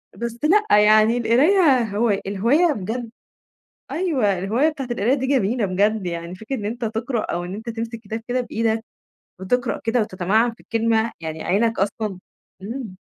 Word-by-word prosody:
بس 235 0 -5
لأ 385 - +4
يعني 215 +2 +5
القراية 270 - +4
هوا 215 +1 +1
الهواية 245 - +2
بجد 225 +2 -5 0.8
أيوه 265 - 0
الهواية 220 - +1
بتاعة 295 -4 -4
القراية 240 +2 +1
دي 265 -1 -2
جميلة 245 -4 +1
بجد، 200 +2 +1
يعني 170 0 -5
فكرة 220 +8 -5
إن 210 - -6
أنت 235 +3 -3
تقرأ 225 +2 -2
أو 175 -4 -3
أنت 205 +6 -7
تمسك 230 0 -5
كتاب 220 +1 -6
كده 250 +1 0
بإيدك 225 -2 -1 0.6
وتقرأ 240 +6 -1
كده 230 +2 +2
وتتمعن 210 +4 +1
في - - -25
الكلمة، 225 0 0
يعني 160 -1 -5
عينَك 225 +5 +1
أصلًا 200 0 -2 0.4
إمم. 220 -2 -6
225 Hz, 155 wpm, -22 LUFS, 205-245 Hz, 0.8 s, يعني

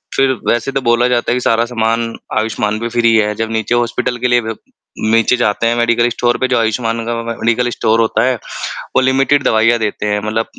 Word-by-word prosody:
फिर 135 -1 +3 0.2
वैसे 120 +3 0
तो 135 - -2
बोला 120 0 +2
जाता 120 -1 0
है 120 - +2
कि - - 0
सारा 115 -1 +2
सामान 115 -1 -1 0.2
आयुष्मान 110 -1 -1
पे 115 - -3
फ़्री 115 -1 +2
है, 105 -1 +2
जब 110 0 -3
नीचे 110 +1 -1
हॉस्पिटल 120 +1 -1
के 125 +1 0
लिए 120 0 +3
ब 110 -1 -5 0.6
नीचे 115 +2 +3
जाते 115 -1 0
हैं, 115 - +1
मेडिकल 120 0 +2
स्टोर 120 0 0
पे, 130 - 0
जो 125 - +1
आयुष्मान 115 0 -1
का 120 - -2
व 115 - -4
मे 115 - -3
मेडिकल 120 +2 0
स्टोर 115 -1 0
होता 110 0 +1
है, 130 -1 +1
वो 115 - -4
लिमिटेड 135 +2 +2
दवाइयाँ 115 +2 +3
देते 105 -1 -3
हैं, 105 0 0
मतलब 110 +1 -1
115 Hz, 225 wpm, -15 LUFS, 110-120 Hz, 0.6 s, फिर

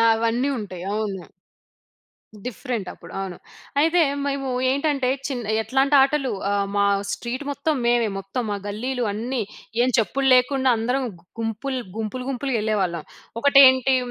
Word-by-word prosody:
అవన్నీ 230 +4 0
ఉంటాయి. 185 -4 -6
అవును. 205 -4 -2 1.2
డిఫరెంట్ 240 -5 -4
అప్పుడు - - -13
అవును. 190 -2 -5 0.4
అయితే 330 +3 +4 0.2
మేము 275 -1 -2 0.2
ఏంటంటే, 280 -2 0 0.2
చిన్న 240 -6 -3
ఎట్లాంటి 270 +4 +2
ఆటలు 275 -2 +2 0.2
ఆహ్, 200 -1 +1
మా 200 0 +3 0.3
స్ట్రీట్ 250 +4 -4
మొత్తం 295 +3 0
మేమే, 240 -2 +3
మొత్తం 195 +6 -4
ఆ - - -4
గల్లీలు 245 +4 -2
అన్నీ, 235 +4 -2 0.4
ఏం 255 - +3
చెప్పులు 265 +5 +1
లేకుండా 260 +1 +3
అందరం 250 +4 0 0.4
గుంపులు 245 +4 -2 0.2
గుంపులు, 225 +4 -3
గుంపులుగా 265 -1 -1
వెళ్ళేవాళ్ళం. 190 -7 -1 0.4
ఒకటేంటి 265 -2 +6
250 Hz, 130 wpm, -23 LUFS, 215-270 Hz, 1.2 s, ఒకటేంటి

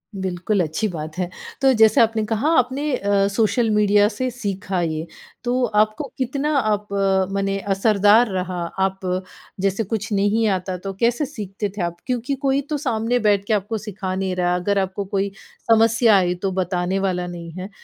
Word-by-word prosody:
बिल्कुल, 190 +1 -1
अच्छी 160 +7 -1
बात 160 -3 -6
है। 180 -1 -1 0.3
तो 270 -1 +5
जैसा 220 +1 +6
आपने 225 -1 0
कहा 225 +7 0
आपने 265 +4 -1
अ, 200 -3 +1
सोशल 220 +3 +1
मीडिया 205 -1 +4
से 255 +4 -2
सीखा 200 -5 -3
ये, 160 -1 -2 0.4
तो 250 +1 0 0.2
आपको 215 +5 +1
कितना 280 +4 -1
अप 210 -3 0 0.4
मने 195 0 -1
असरदार 210 +3 +4
रहा? 185 -1 -3 0.2
आप 190 0 0 0.6
जैसे 195 +3 +1
कुछ 215 +1 -4
नहीं 205 +3 +2
आता, 185 -1 -2
तो 195 +2 -6
कैसे 240 +5 +2
सीखते 210 -6 -5
थे - - -2
आप? 170 0 -2
क्योंकि 250 +2 -1
कोई 275 0 +1
तो 300 - 0
सामने 235 -2 0
बैठ 205 -2 +2
के 220 - +2
आपको 210 +2 -1
सिखा 200 -2 -5
नहीं 190 -1 -2
रहा, 180 0 +1
अगर 200 +3 0
आपको 190 +1 -2
कोई 195 0 -1 0.4
समस्या 225 -1 +5
आई 180 -1 +1
तो 195 - 0
बताने 185 0 -1
वाला 180 -2 -1
नहीं 170 -1 -7
है। 185 +2 -6
205 Hz, 175 wpm, -21 LUFS, 190-225 Hz, 0.6 s, जैसा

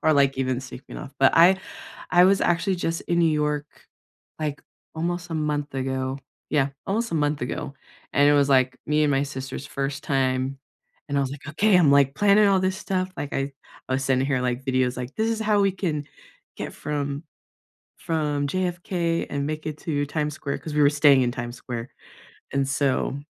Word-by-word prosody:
Or, 155 - +4
like, 140 -2 +3
even 130 -1 0
sweeping 130 0 -10
off. 140 - -9
But 135 -1 +5
I 180 +3 +6 0.5
I 180 0 +6
was 195 +1 +4
actually 175 +3 +1
just 165 -1 -2
in 170 0 0
New 165 -2 +4
York, 150 -1 0 0.7
like, 150 -2 -3 0.3
almost 175 +2 -3
a - - -2
month 150 -2 -2
ago. 130 0 -2 0.3
Yeah, 140 -2 +2 0.2
almost 230 +4 -1
a - - 0
month 145 -1 0
ago, 140 +2 -4 0.4
and 145 0 +5
it 145 - +5
was, 140 -1 +4
like, 130 -1 +3
me 150 0 +2
and 145 - +2
my 135 0 +2
sister's 135 -1 -6
first 140 +1 -3
time. 135 0 0 0.5
And 140 0 0
I - - +3
was 135 -1 -1
like, 145 +1 -9
"Okay. 195 +6 +3
I'm, 165 -5 +5
like, 140 -1 +4
planning 205 +2 +5
all 190 -1 +3
this 185 0 0
stuff." 185 -2 -2
Like, 145 - -5
I 135 +1 -1 0.4
I 130 - -2
was 135 0 0
sending 130 0 +2
her, 130 -3 +1
like, 125 +1 -2
videos, 130 -1 +1
like, 125 +2 -6
"This 220 +1 +1
is 225 - -2
how 210 -2 +2
we 195 -1 +4
can 155 -7 -2 0.5
get - - -5
from 145 0 -3 0.7
from 150 -3 -1
JFK 175 -1 -1
and 140 0 -2
make 155 0 -4
it 150 - -4
to 145 -3 -1
Times 150 0 -2
Square." 140 -2 -4
'Cause 155 - -7
we 150 - +3
were 140 - +6
staying 145 -2 +5
in 120 - 0
Times 120 0 -5
Square. 120 -1 -6 0.6
And 135 -1 0
so 135 0 0
145 Hz, 200 wpm, -24 LUFS, 135-170 Hz, 0.7 s, I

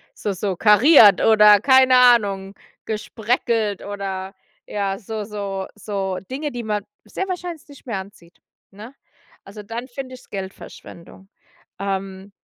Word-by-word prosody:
So 205 - -3
so 190 0 -3
kariert 210 - +6
oder 210 -2 +6
keine 260 -1 +5
Ahnung, 205 -6 +3 0.3
gespreckelt 220 -1 -2
oder 195 -1 -5 0.3
ja, 195 -1 -3
so 215 0 -6
so 200 -2 -5
so 195 -2 -4
Dinge, 290 +3 -4
die 245 -1 -6
man 210 -2 -2 0.2
sehr 380 - -5
wahrscheinlich 355 -4 -6
nicht 285 -2 -16
mehr 220 -6 -3
anzieht, 185 -3 -14 0.3
ne? 220 +7 -12 0.5
Also, 205 +2 -11
dann 230 +5 -7
finde 255 0 -8
ich 250 - -15
es - - -24
Geldverschwendung. 190 -1 -10 0.5
Ähm 195 0 -5
210 Hz, 135 wpm, -21 LUFS, 195-240 Hz, 0.5 s, kariert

